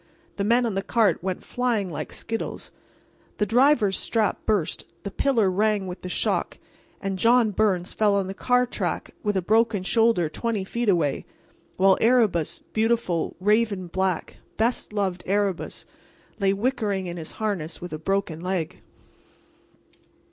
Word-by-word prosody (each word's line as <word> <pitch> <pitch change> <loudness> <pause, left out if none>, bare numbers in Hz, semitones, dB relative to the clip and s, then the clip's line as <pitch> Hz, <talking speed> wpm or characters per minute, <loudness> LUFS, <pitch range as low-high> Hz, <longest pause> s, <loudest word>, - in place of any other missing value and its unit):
The 200 - 0
men 235 +4 +3
on 225 - -1
the 195 - -1
cart 220 -2 +2
went 185 0 -3
flying 240 -5 -1
like - - -5
skittles. 225 0 -5 0.7
The 210 - +1
driver's 235 -3 +3
strap 220 -4 0
burst, 205 -7 0 0.2
the 200 - -5
pillar 225 -5 +2
rang 210 +1 +1
with 180 0 -7
the 180 - -6
shock, - - 0 0.4
and 195 -2 -3
John 235 0 +4
Byrnes 195 -3 +1
fell 210 -2 +2
on 200 -1 +1
the 190 - -5
car 250 +4 +2
track 245 - -3
with 205 -2 0
a 185 - 0
broken 220 0 +2
shoulder 225 -4 +3
twenty 215 +5 -2
feet 235 +4 -1
away, 160 -7 +1 0.5
while 190 0 +4
Erebus—beautiful, 220 -3 +1
raven 210 -1 +2
black, 185 0 -2 0.2
best 230 +1 0
loved 195 -4 -1
Erebus—lay 195 0 -3
whickering 205 -3 -1
in 175 0 -5
his 160 -2 -6
harness 195 -7 -3
with 175 -2 -7
a 155 - -4
broken 195 -2 -1
leg. 180 -3 -3
200 Hz, 145 wpm, -25 LUFS, 185-225 Hz, 0.7 s, John